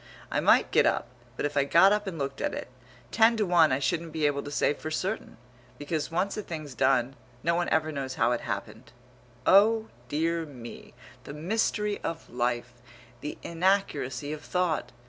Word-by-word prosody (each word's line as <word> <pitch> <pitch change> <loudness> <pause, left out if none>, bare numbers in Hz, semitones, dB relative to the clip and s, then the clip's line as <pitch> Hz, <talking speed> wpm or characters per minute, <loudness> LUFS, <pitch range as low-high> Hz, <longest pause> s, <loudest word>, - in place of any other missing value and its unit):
I - - +1
might - - +4
get - - +4
up, - - +1 0.3
but - - -1
if 145 - -3
I 140 - +4
got 170 +7 +6
up 210 -1 -1
and 180 -4 -4
looked 135 -1 -4
at - - -1
it, - - -6 0.4
ten 230 +1 +4
to 215 - +1
one 175 -4 +5
I 130 - +2
shouldn't 165 +4 -1
be 160 -2 0
able 145 -1 +1
to 145 - -7
say 145 - +1
for 155 - -7
certain; 190 - -3 0.4
because 150 +1 -3
once 180 +4 -1
a 210 - -3
thing's 155 -7 -7
done, 130 +1 +2 0.3
no 170 - +2
one 175 +1 0
ever 155 0 +1
knows 135 -3 -4
how - - +2
it 120 - 0
happened. 110 +2 -6 0.5
Oh! 220 +3 +5 0.2
dear 165 +3 0
me, 125 -5 -11 0.3
the - - -7
mystery 210 +4 -1
of 165 -1 -5
life; 120 0 -1 0.5
The 150 - -6
inaccuracy 165 -6 0
of 155 - -7
thought! 165 -8 -1
155 Hz, 185 wpm, -28 LUFS, 135-180 Hz, 0.5 s, got